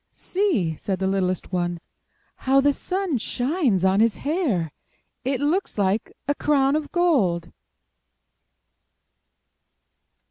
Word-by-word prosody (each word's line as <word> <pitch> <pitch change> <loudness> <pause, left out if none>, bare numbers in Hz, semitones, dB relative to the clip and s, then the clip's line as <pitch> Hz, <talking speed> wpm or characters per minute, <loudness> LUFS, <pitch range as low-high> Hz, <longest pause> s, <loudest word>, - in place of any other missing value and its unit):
''See!" 260 - 0
said 195 -2 -2
the 190 - -2
littlest 185 -1 -1
one. 175 -1 -1 0.6
"How 270 +1 +3
the 285 +1 +3
sun 365 -4 -2
shines 245 - 0
on 190 +1 +3
his 225 0 +3
hair! 275 - 0 0.5
It 265 0 -1
looks 325 - 0
like 200 +2 0 0.2
a 285 - +2
crown 285 -1 +2
of 305 -1 -2
gold." 200 - +1
250 Hz, 110 wpm, -24 LUFS, 190-300 Hz, 0.6 s, How